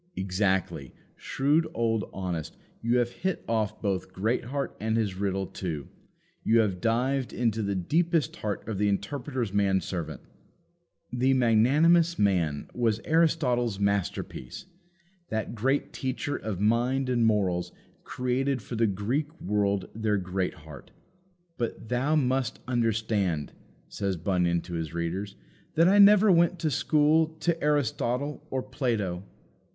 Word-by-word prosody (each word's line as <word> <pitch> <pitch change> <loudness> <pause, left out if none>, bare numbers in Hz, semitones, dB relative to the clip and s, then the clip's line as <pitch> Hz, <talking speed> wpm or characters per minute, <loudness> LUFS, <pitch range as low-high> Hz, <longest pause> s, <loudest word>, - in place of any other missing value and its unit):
Exactly; 95 - -1 0.2
shrewd 150 +4 +1
old 115 -3 0
Honest; 90 -5 -4 0.2
you 115 +2 +2
have 120 -1 +1
hit 185 +6 -3
off 110 -3 -1
both 95 -3 -1
Greatheart 120 +7 -2
and 110 +1 0
his 105 -4 0
riddle 95 0 -1
too. 80 -7 -5 0.5
You 115 0 +4
have 95 -5 -1
dived 125 +3 0
into 115 -2 0
the 100 -1 -1
deepest 160 - +1
heart 105 -1 -4
of 110 -4 -3
the 105 - +2
Interpreter's 120 +2 -2
man 100 -2 +3
servant. 85 -2 -5 0.9
"The 130 +2 +2
magnanimous 150 +9 +4
man" 85 -8 +1
was 115 -3 +1
Aristotle's 125 -10 +2
masterpiece. 100 - -2 0.6
That 110 0 -2
great 135 +5 0
teacher 130 +2 -3
of 105 -4 -4
mind 120 +5 +1
and 125 -2 +1
morals 95 -5 +1 0.3
created 130 +2 -1
for 115 +2 -7
the 115 0 +2
Greek 130 - -2
world 100 -1 0
their 110 -1 0
Greatheart. 90 -5 -4 0.7
But, 115 -1 -4
"thou 130 +5 +1
must 130 -4 0
understand," 110 - 0 0.3
says 100 -2 -2
Bunyan 85 -1 +1
to 90 - -9
his 80 -1 -4
readers, 90 +4 -3 0.4
"that 165 +2 +5
I 200 +2 +5
never 205 0 +7
went 170 +1 +4
to 155 -3 0
school 155 +2 +2
to 170 -2 0
Aristotle 145 -1 0
or 130 -1 -2
Plato. 115 -9 -2
115 Hz, 130 wpm, -27 LUFS, 95-135 Hz, 0.9 s, never